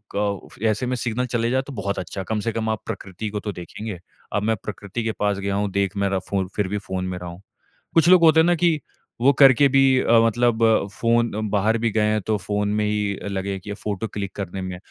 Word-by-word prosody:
क 100 Hz, -1 st, -2 dB, 0.2 s
ऐसे 110 Hz, +3 st, 0 dB
में 125 Hz, +1 st, -1 dB
सिग्नल 120 Hz, +1 st, -1 dB
चले 115 Hz, 0 st, 0 dB
जाएँ 130 Hz, 0 st, +1 dB
तो 140 Hz, -, -7 dB
बहुत 100 Hz, -3 st, -3 dB
अच्छा, 95 Hz, +2 st, -5 dB
कम 105 Hz, +3 st, -2 dB
से 115 Hz, -, -1 dB
कम 110 Hz, -1 st, -2 dB
आप 110 Hz, -, -2 dB
प्रकृति 100 Hz, -1 st, -5 dB
को 105 Hz, 0 st, -3 dB
तो 105 Hz, -, -3 dB
देखेंगे, 90 Hz, +2 st, -7 dB, 0.3 s
अब 105 Hz, -1 st, 0 dB
मैं 110 Hz, +1 st, +2 dB
प्रकृति 105 Hz, +2 st, -5 dB
के 110 Hz, -, 0 dB
पास 105 Hz, -1 st, +1 dB
गया 100 Hz, 0 st, -2 dB
हूँ 100 Hz, 0 st, 0 dB
देख 100 Hz, 0 st, -1 dB
मेरा 100 Hz, -1 st, +1 dB
फ़ो 95 Hz, -2 st, 0 dB
फिर 105 Hz, -2 st, 0 dB
भी 105 Hz, +2 st, -2 dB
फ़ोन 95 Hz, -2 st, -4 dB
में 90 Hz, -1 st, -4 dB
रहा 90 Hz, -1 st, -7 dB
हूँ। 85 Hz, +3 st, -11 dB, 0.5 s
कुछ 165 Hz, +1 st, +5 dB
लोग 185 Hz, -2 st, +7 dB
होते 160 Hz, 0 st, +6 dB
हैं -, -, +3 dB
ना 175 Hz, -, +4 dB
कि 165 Hz, -2 st, +2 dB, 0.4 s
वो 135 Hz, +3 st, +6 dB
करके 135 Hz, +1 st, +6 dB
भी 135 Hz, 0 st, +4 dB, 0.2 s
अ, -, -, 0 dB, 0.2 s
मतलब 120 Hz, 0 st, +1 dB, 0.3 s
फ़ोन 115 Hz, +1 st, +1 dB, 0.2 s
बाहर 110 Hz, +2 st, +2 dB
भी 115 Hz, 0 st, +1 dB
गए 110 Hz, -, +1 dB
हैं 110 Hz, 0 st, +1 dB
तो 110 Hz, -, +2 dB
फ़ोन 105 Hz, +1 st, -2 dB
में 105 Hz, -, +1 dB
ही 105 Hz, -1 st, 0 dB
अ, -, -, -7 dB
लगे 100 Hz, 0 st, -3 dB
हैं 95 Hz, -, -4 dB
कि 105 Hz, +1 st, -6 dB
फ़ोटो 105 Hz, +1 st, -4 dB
क्लिक 100 Hz, -2 st, -5 dB
करने 95 Hz, -1 st, -5 dB
में। 90 Hz, -1 st, -5 dB
105 Hz, 245 wpm, -23 LUFS, 100-115 Hz, 0.5 s, लोग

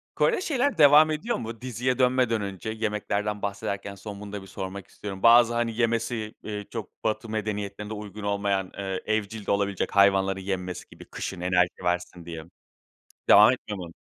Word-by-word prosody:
Kore'de 460 Hz, -6 st, +2 dB
şeyler, 280 Hz, -, 0 dB
devam 150 Hz, +1 st, +7 dB
ediyor 190 Hz, +11 st, -1 dB
mu? 115 Hz, +1 st, -7 dB
Diziye 125 Hz, +1 st, -1 dB
dönmeden 125 Hz, -3 st, +3 dB
önce, 100 Hz, +1 st, -5 dB
yemeklerden 105 Hz, -1 st, -2 dB
bahsederken, 100 Hz, 0 st, -4 dB
son, 100 Hz, +1 st, -8 dB
bunu 100 Hz, -1 st, -8 dB
da 100 Hz, -, -4 dB
bir 95 Hz, -, -12 dB
sormak 95 Hz, 0 st, -6 dB
istiyorum. 95 Hz, -2 st, -8 dB
Bazı, 120 Hz, 0 st, +7 dB
hani, 120 Hz, -1 st, -1 dB
yemesi, 115 Hz, -2 st, 0 dB
eee, 105 Hz, -1 st, -5 dB
çok, -, -, -8 dB
batı 110 Hz, +1 st, -1 dB
medeniyetlerinde 105 Hz, -1 st, -3 dB
uygun 105 Hz, 0 st, -8 dB
olmayan, 100 Hz, -2 st, 0 dB
ııı, 95 Hz, -1 st, -2 dB
evcil 110 Hz, 0 st, -2 dB
de -, -, 0 dB
olabilecek 100 Hz, -1 st, 0 dB
hayvanları 95 Hz, -1 st, +4 dB
yenmesi 95 Hz, -2 st, -4 dB
gibi, -, -, -13 dB
kışın 90 Hz, -2 st, -6 dB
enerji 90 Hz, 0 st, +1 dB
versin 90 Hz, -1 st, -2 dB
diye. 80 Hz, -2 st, -7 dB, 0.9 s
Devam 105 Hz, +4 st, +9 dB
etmiyor 105 Hz, -5 st, -4 dB
mu? 85 Hz, -2 st, -7 dB
105 Hz, 165 wpm, -26 LUFS, 95-115 Hz, 0.9 s, Devam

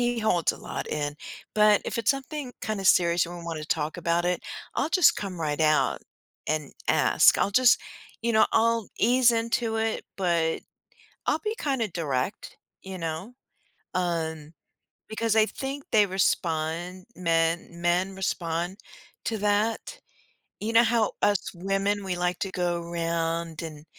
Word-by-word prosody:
he 240 Hz, 0 st, +1 dB
holds 180 Hz, -7 st, +2 dB
a -, -, -11 dB
lot -, -, -5 dB
in, 145 Hz, -1 st, -2 dB, 0.4 s
but, 210 Hz, -1 st, +5 dB
if -, -, -3 dB
it's 225 Hz, -1 st, +3 dB
something 275 Hz, -1 st, -4 dB
kinda 215 Hz, -3 st, -3 dB
serious 170 Hz, -2 st, +4 dB
and 175 Hz, +1 st, -8 dB
we 170 Hz, -, -9 dB
wanna 160 Hz, -2 st, -4 dB
talk 155 Hz, +1 st, -1 dB
about 170 Hz, 0 st, +1 dB
it, 180 Hz, 0 st, 0 dB, 0.3 s
I'll -, -, 0 dB
just 365 Hz, +2 st, +5 dB
come 190 Hz, -3 st, -5 dB
right 150 Hz, -1 st, -1 dB
out 155 Hz, -1 st, +3 dB, 0.5 s
and 155 Hz, -2 st, -2 dB, 0.2 s
ask, -, -, +5 dB
I'll -, -, +2 dB
just 250 Hz, +4 st, +5 dB, 0.4 s
you 235 Hz, 0 st, +1 dB
know, 220 Hz, -, +5 dB
I'll 230 Hz, -1 st, +2 dB
ease 245 Hz, +2 st, +5 dB
into 230 Hz, 0 st, 0 dB
it, 220 Hz, 0 st, -1 dB
but 170 Hz, -4 st, +1 dB, 0.7 s
I'll -, -, +2 dB
be 430 Hz, +1 st, -1 dB
kinda 265 Hz, -6 st, 0 dB
direct. 150 Hz, -1 st, -3 dB, 0.3 s
You 190 Hz, -1 st, -7 dB
know? 165 Hz, +6 st, -5 dB, 0.6 s
Um, 160 Hz, -3 st, -2 dB, 0.6 s
because 225 Hz, 0 st, 0 dB
I 220 Hz, -1 st, +6 dB
think 275 Hz, +4 st, -5 dB
they 210 Hz, -2 st, +5 dB
respond 175 Hz, -1 st, -1 dB
men 165 Hz, -1 st, +1 dB
men 180 Hz, +3 st, +1 dB
respond 175 Hz, -1 st, -2 dB, 0.5 s
to 225 Hz, -, -1 dB
that. 210 Hz, -, 0 dB, 0.6 s
You 220 Hz, +2 st, -3 dB
know 230 Hz, +1 st, +7 dB
how 230 Hz, -2 st, +2 dB
us 205 Hz, -2 st, +1 dB
women, 195 Hz, +3 st, -1 dB
we 190 Hz, -2 st, -2 dB
like 180 Hz, 0 st, -1 dB
to 195 Hz, -, -3 dB
go 175 Hz, -1 st, -1 dB
around 165 Hz, -1 st, -2 dB
and, 155 Hz, -2 st, -8 dB
185 Hz, 155 wpm, -26 LUFS, 165-220 Hz, 0.7 s, know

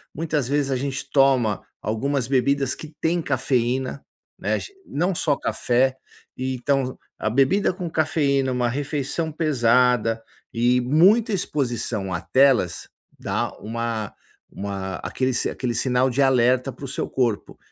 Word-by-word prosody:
muitas 150 Hz, -4 st, -1 dB
vezes 140 Hz, -1 st, 0 dB
a -, -, +1 dB
gente 135 Hz, +1 st, -3 dB
toma 130 Hz, -7 st, +3 dB, 0.2 s
algumas 125 Hz, +3 st, -1 dB
bebidas 135 Hz, 0 st, +1 dB
que 155 Hz, 0 st, -10 dB
têm 170 Hz, +1 st, +1 dB
cafeína, 130 Hz, -1 st, -1 dB, 0.4 s
né, -, -, -1 dB
a -, -, 0 dB
gen 400 Hz, -, -9 dB
não 175 Hz, +5 st, -1 dB
só 150 Hz, -3 st, +1 dB
café, 130 Hz, +1 st, +1 dB, 0.4 s
e 130 Hz, 0 st, -2 dB
então 130 Hz, 0 st, -1 dB, 0.2 s
a -, -, 0 dB
bebida 135 Hz, -, +2 dB
com 180 Hz, -2 st, -5 dB
cafeína, 145 Hz, -4 st, +1 dB
uma 125 Hz, -1 st, 0 dB
refeição 145 Hz, +4 st, -2 dB
pesada 125 Hz, -6 st, +2 dB, 0.3 s
e 120 Hz, +2 st, +3 dB
muita 190 Hz, -, +4 dB
exposição 120 Hz, -, -2 dB
à 85 Hz, -, -2 dB
telas, 130 Hz, -4 st, +2 dB, 0.3 s
dá -, -, -2 dB
uma 115 Hz, -1 st, -3 dB, 0.4 s
uma 95 Hz, -2 st, -4 dB
aquele 130 Hz, -1 st, -2 dB
si -, -, 0 dB
aquele 125 Hz, -2 st, -3 dB
sinal 125 Hz, +2 st, +2 dB
de 140 Hz, +3 st, +1 dB
alerta 130 Hz, 0 st, +3 dB
para 140 Hz, +3 st, -9 dB
o -, -, -5 dB
seu 135 Hz, -, -3 dB
corpo. 120 Hz, -5 st, -1 dB
130 Hz, 145 wpm, -23 LUFS, 120-145 Hz, 0.4 s, muita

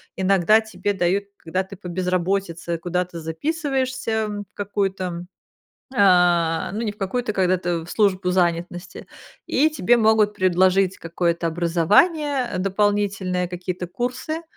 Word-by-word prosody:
иногда 195 Hz, +2 st, +4 dB
тебе 205 Hz, -2 st, -3 dB
дают, 190 Hz, +2 st, 0 dB
когда 185 Hz, +3 st, -2 dB
ты 190 Hz, +1 st, -11 dB
по 185 Hz, -1 st, -10 dB
безработице 180 Hz, -1 st, -1 dB
куда-то 180 Hz, 0 st, -3 dB
записываешься, 255 Hz, -, -2 dB
в 205 Hz, -1 st, -5 dB
какую-то, 190 Hz, -3 st, -3 dB, 0.7 s
а, 175 Hz, -5 st, +3 dB
ну 215 Hz, +3 st, -3 dB
не 215 Hz, -3 st, -2 dB
в 205 Hz, -, -23 dB
какую-то, 215 Hz, +3 st, -2 dB
когда-то 180 Hz, -3 st, 0 dB
в -, -, -10 dB
службу 190 Hz, -3 st, +1 dB
занятности, 175 Hz, 0 st, -2 dB, 0.4 s
и 305 Hz, +4 st, +2 dB
тебе 240 Hz, -6 st, +3 dB
могут 220 Hz, -2 st, +3 dB
предложить 185 Hz, +1 st, +2 dB
какое-то 170 Hz, 0 st, -1 dB
образование 210 Hz, -, +2 dB
дополнительное, 195 Hz, -2 st, 0 dB
какие-то 180 Hz, 0 st, -5 dB
курсы, 250 Hz, -, -4 dB
190 Hz, 120 wpm, -22 LUFS, 175-210 Hz, 0.7 s, иногда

